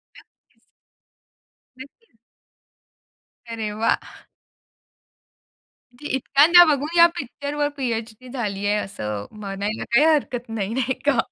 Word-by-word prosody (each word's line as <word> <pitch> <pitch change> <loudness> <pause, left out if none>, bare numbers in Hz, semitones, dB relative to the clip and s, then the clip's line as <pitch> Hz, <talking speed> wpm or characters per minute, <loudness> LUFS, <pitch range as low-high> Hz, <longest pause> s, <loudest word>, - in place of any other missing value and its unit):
नक्कीच. - - -23 1.2
नक्कीच. 275 - -15 1.3
अरे 220 -2 -4
वाह! 225 +2 -2 1.7
म्हणजे 295 +4 -8
इतक्यांदा 305 +7 +6
बघून 300 +2 -1
या 340 - +9
पिक्चरवर 290 +2 -3
पी-एच-डी 235 -1 -4
झाली 205 -6 -4
आहे, 205 - +2
असं 105 - -5
म्हणायला 205 0 -5
काही 275 +6 +5
हरकत 245 -5 -2
नाही, 220 -1 -3
नाही 265 0 0
का? 280 -4 +3
245 Hz, 100 wpm, -22 LUFS, 215-285 Hz, 1.7 s, या